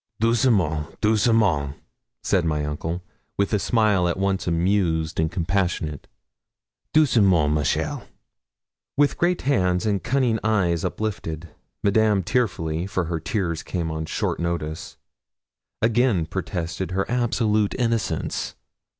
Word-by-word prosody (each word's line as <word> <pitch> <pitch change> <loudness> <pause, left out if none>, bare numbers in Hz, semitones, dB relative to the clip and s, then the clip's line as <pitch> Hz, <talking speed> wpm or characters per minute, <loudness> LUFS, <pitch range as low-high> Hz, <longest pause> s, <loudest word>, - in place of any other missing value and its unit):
'Doucement 105 - +1
doucement!' 105 - +2 0.5
said 95 - +2
my 75 -2 0
uncle, 80 +4 -4 0.3
with 100 +2 0
a 105 - +3
smile 105 -4 +2
at 85 - -1
once 95 -1 -1
amused 85 -2 +1
and 80 0 +1
compassionate. 85 -4 -1 0.8
'Doucement! 100 - +4
ma 75 0 +1
chère.' 70 - -1 0.9
With 145 0 +2
great 175 +1 +1
hands 90 -8 +1
and 100 -5 0
cunning 125 -3 +1
eyes 95 -7 +1
uplifted, 85 -4 -4 0.3
Madame 105 -1 +3
tearfully 85 -6 -1
for 95 -2 -1
her 85 0 -3
tears 85 -1 -2
came 85 -3 -3
on 80 0 -4
short - - -2
notice 85 -2 -3 0.9
again 115 -6 +3
protested 85 +3 -4
her 95 +1 -1
absolute 110 -4 +1
innocence. 115 -2 -1
95 Hz, 115 wpm, -23 LUFS, 80-110 Hz, 0.9 s, Doucement